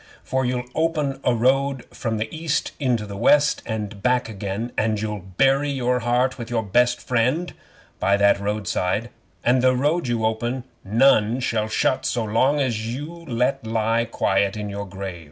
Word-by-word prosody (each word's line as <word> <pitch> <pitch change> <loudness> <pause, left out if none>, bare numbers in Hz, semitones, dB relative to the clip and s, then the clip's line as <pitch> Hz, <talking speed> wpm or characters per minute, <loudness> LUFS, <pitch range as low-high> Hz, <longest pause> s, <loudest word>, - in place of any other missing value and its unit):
For 130 0 -1
you'll 125 0 -2
open 150 -4 0
a 125 - +2
road 135 +2 +1
from 115 -2 -2
the 110 +1 -2
East 155 -2 -1
unto 120 -5 +1
the 100 -1 -7
West, 145 +7 +3
and 105 -2 -4
back 125 +2 +2
again, 105 +2 -4
and 110 -1 0
you'll 105 -1 -3 0.2
bury 135 +2 +3
your 125 -2 0
heart 125 +2 +1
with 115 - -6
your 115 -2 0
best 120 +4 +2
friend 125 +9 0 0.5
by 100 +1 +3
that 100 0 +4
road 105 0 -2
side, 95 +7 -1 0.3
and 125 +1 +3
the 130 0 +4
road 145 +4 +1
you 115 -2 0
open 120 +3 -1 0.2
none 115 +1 +3
shall 110 -4 0
shut 130 +4 +1
so 120 - -1
long 130 +7 +2
as 115 -4 -1
you're 165 +4 -8
let 125 -1 0
lie 115 +1 +1
quiet 100 -2 0
in 105 -1 -4
your 100 0 -5
grave." 95 -2 -6
120 Hz, 175 wpm, -23 LUFS, 110-130 Hz, 0.5 s, that